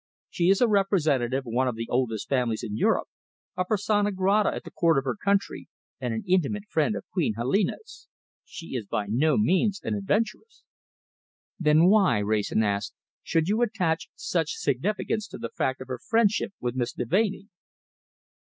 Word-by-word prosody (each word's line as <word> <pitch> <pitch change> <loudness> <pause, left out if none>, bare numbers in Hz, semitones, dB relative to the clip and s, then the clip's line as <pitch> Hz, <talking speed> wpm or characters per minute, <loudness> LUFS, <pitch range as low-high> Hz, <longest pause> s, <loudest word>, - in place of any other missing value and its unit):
"She 175 0 +1
is 195 +3 +3
a 245 - +5
representative 150 - +1
of 115 - -7
one 130 +2 +2
of 125 - -1
the 115 +1 -4
oldest 120 -4 -1
families 125 -5 0
in 105 - -4
Europe, - - +1 0.5
a 185 - 0
persona 205 +1 +1
grata 195 +2 +2
at - - -6
the 170 - -10
Court 165 -2 +2
of 135 - +1
her 135 - -2
country, 200 -1 -1 0.3
and 125 -2 -2
an 110 0 -3
intimate 190 +3 0
friend 210 +4 +1
of - - -6
Queen 160 - 0
Helena's. 195 - -2 0.4
She 165 - -10
is 110 -5 -4
by 105 - -2
no 140 - +2
means 205 0 +2
an - - -2
adventuress." 220 - -2 1.0
"Then 155 0 +4
why," 190 - +4
Wrayson 105 +1 0
asked, 100 -1 -2 0.3
"should 165 0 0
you 215 +4 +1
attach 185 -8 0
such 455 0 -1
significance 215 - -1
to - - -9
the 115 - -5
fact 130 0 -2
of 130 - -8
her 130 -2 -5
friendship 220 - +1
with 120 -1 -2
Miss 125 -1 -2
Deveney?" 195 - -1
170 Hz, 170 wpm, -26 LUFS, 125-205 Hz, 1.0 s, a